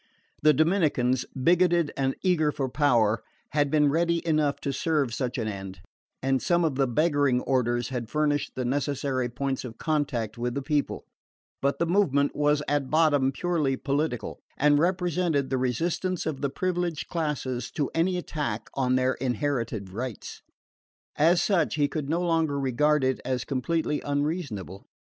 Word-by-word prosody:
The 155 - +6
Dominicans, 150 -6 +2 0.2
bigoted 175 -1 +3
and 135 -1 0
eager 165 -5 +2
for 135 -2 -2
power, 120 -6 +2 0.3
had 145 -1 +2
been 150 -1 +3
ready 170 +2 +1
enough 155 -3 +1
to 140 - -2
serve 145 -4 0
such 125 +1 -2
an 115 -3 -2
end, 95 -2 -6 0.4
and 135 0 +1
some 175 -1 +2
of 155 - +1
the 135 0 +1
begging 145 -1 +2
orders 120 -3 0
had 120 -3 -4
furnished 150 -1 0
the 130 - -2
necessary 135 -1 -1
points 135 +2 -3
of 120 -3 -8
contact 135 -8 -1
with 120 0 -2
the 140 - -2
people; 145 0 -1 0.6
but 140 +1 +1
the 170 - +1
movement 160 -6 +2
was 150 0 +2
at 145 -2 0
bottom 150 -4 +3
purely 150 -4 0
political, 140 -5 -2 0.2
and 145 0 +4
represented 175 -5 0
the 130 - +1
resistance 165 +8 -1
of 150 -4 -3
the 140 - 0
privileged 175 0 -2
classes 140 -7 -2
to 145 -3 -2
any 180 +3 +1
attack 150 -10 -4
on 130 -2 +1
their 130 0 +2
inherited 120 -6 -2
rights. 120 +1 -6 0.7
As 170 +3 +4
such, 175 -9 +1
he 145 -2 +2
could 145 -2 -4
no 170 +3 +1
longer 165 -4 +1
regard 140 +3 +2
it 130 -1 0
as 125 -1 -2
completely 150 +3 -1
unreasonable. 145 - -3
145 Hz, 160 wpm, -27 LUFS, 130-160 Hz, 0.7 s, The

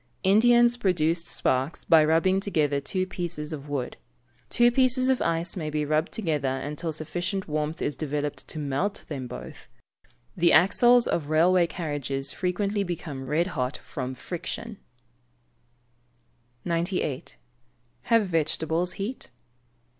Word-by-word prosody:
Indians 240 +4 +5
produce 170 -5 +1
sparks 130 +5 -1
by 160 -2 +6
rubbing 165 +5 +3
together 155 -8 0
two 185 +7 -2
pieces 170 -4 -4
of 145 -1 -7
wood. 135 -4 -3 0.5
Two 240 0 +4
pieces 255 +1 +3
of 260 - +2
ice 165 +1 -1
may 160 -5 -3
be 150 0 -1
rubbed 155 +3 0
together 150 -10 -1
until 150 +4 -4
sufficient 175 +5 -3
warmth 150 +1 -2
is 145 - -1
developed 150 -1 -3
to - - -6
melt 150 +7 -2
them 135 -5 -5
both. 65 - -9 0.7
The 170 -1 +3
axles 240 +8 +6
of 150 -4 -1
railway 170 +3 +4
carriages 145 -5 -3
frequently 200 +3 -1
become 155 -7 -5
red 155 +5 +1
hot 130 -1 -2
from 130 -3 -6
friction. 185 - -6 1.9
90. 170 -5 -1 0.8
_Have 230 -2 +4
vegetables 165 +1 0
heat? 215 +7 -5
165 Hz, 125 wpm, -26 LUFS, 150-190 Hz, 1.9 s, by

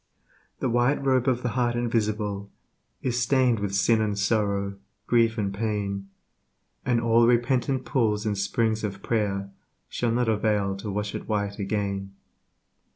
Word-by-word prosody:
The - - +1
White 125 +4 +2
Robe 130 -1 +2
of 125 -1 +1
the 125 - 0
Heart 120 0 0
Invisible 105 -4 -1 0.5
Is 125 -1 0
stained 125 -2 +3
with 100 -1 -2
sin 110 +3 +3
and 105 -2 -1
sorrow, 100 -1 0 0.3
grief 115 -1 +3
and 100 -2 -1
pain, 100 -2 -2 0.7
And 125 -2 +2
all 115 0 +4
repentant 125 +2 +1
pools 110 -5 +1
and 105 -1 0
springs 110 +3 0
of 100 -2 -4
prayer 100 -3 -1 0.4
Shall 120 - -1
not 120 +1 +1
avail 105 -3 +1
to 105 +2 -6
wash 105 +1 -3
it - - -6
white 100 -1 -1
again. 100 -1 -2
110 Hz, 150 wpm, -26 LUFS, 100-120 Hz, 0.7 s, all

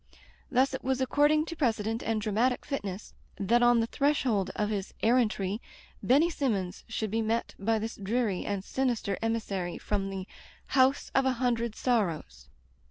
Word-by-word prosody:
Thus 265 +1 +2
it 265 - -4
was 265 0 0
according 295 +4 +3
to 335 - -6
precedent 225 -5 0
and 225 -1 0
dramatic 220 +5 0
fitness, 205 -8 -5 0.2
that 230 +5 +2
on 240 -1 +5
the - - +1
threshold 245 -7 +1
of 210 0 -1
his 200 -2 -4
errantry 220 -3 +2 0.4
Benny 285 +7 +4
Simmons 200 - -2
should 220 -2 -3
be 225 +1 +1
met 225 +1 -1
by 220 +3 +1
this 225 +1 -4
dreary 210 -1 -1
and 200 -2 -3
sinister 240 -5 -1
emissary 205 -6 -2
from 195 -2 -2
the 190 -1 -5 0.4
"House 265 +1 +3
of 270 - +3
a 260 - +3
Hundred 235 -2 0
Sorrows." 165 - -1
225 Hz, 160 wpm, -29 LUFS, 200-255 Hz, 0.4 s, on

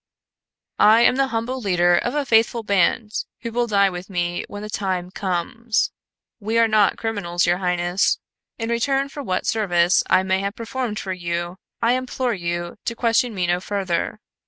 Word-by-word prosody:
"I 220 +2 +6
am 250 - +4
the 275 0 +2
humble 250 +2 -3
leader 175 -4 +3
of 245 +9 -1
a 295 -1 0
faithful 230 -1 +3
band 205 +2 +1 0.3
who 230 - -5
will 240 +1 0
die 200 -3 +3
with 180 +2 -7
me 175 -2 -2
when 205 0 -8
the 210 - -6
time 185 -3 -2
comes. 205 +5 -1 0.5
We 220 +2 -1
are 230 0 +5
not 215 -3 +3
criminals, 195 -6 -1
your 175 +1 +2
highness. 180 0 +1 0.4
In 225 -1 -3
return 270 +4 +1
for 285 - -7
what 185 -8 -2
service 180 -4 +3
I 185 0 +4
may 190 0 +1
have 200 +2 -3
performed 230 -1 -4
for 190 -3 -3
you, 175 0 -4 0.3
I 230 - +4
implore 255 -1 -1
you 175 -1 -4
to 235 - -2
question 230 0 +1
me 180 -2 0
no 175 +1 +1
further. 190 0 -2
205 Hz, 180 wpm, -22 LUFS, 180-230 Hz, 0.5 s, I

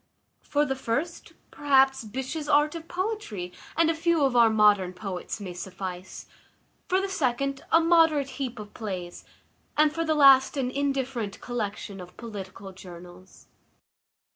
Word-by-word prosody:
For 295 0 0
the 270 -2 -2
first, 275 +7 -3 0.2
perhaps, 270 -3 +3
Byshe's 265 +7 -5
Art 295 +1 +4
of 330 -1 -8
Poetry, 360 - -4 0.3
and 330 0 +4
a 330 - +2
few 325 -1 +1
of 265 -3 +2
our 235 -2 +6
modern 210 -4 +4
poets, 185 +1 -5
may 190 -3 -6
suffice; 185 0 -7 0.6
for 370 - +2
the 390 - -1
second, 275 -6 -1
a 330 - +7
moderate 325 -4 +4
heap 250 -2 -3
of 210 -1 -9
plays; 185 -5 -6 0.5
and, 305 0 +4
for 330 0 -1
the 315 -1 +1
last, 275 -1 +6
an 255 -2 -1
indifferent 265 -7 -2
collection 210 -4 -5
of 180 0 -13
political 200 -3 -8
journals. 180 0 -13
260 Hz, 145 wpm, -26 LUFS, 200-300 Hz, 0.6 s, a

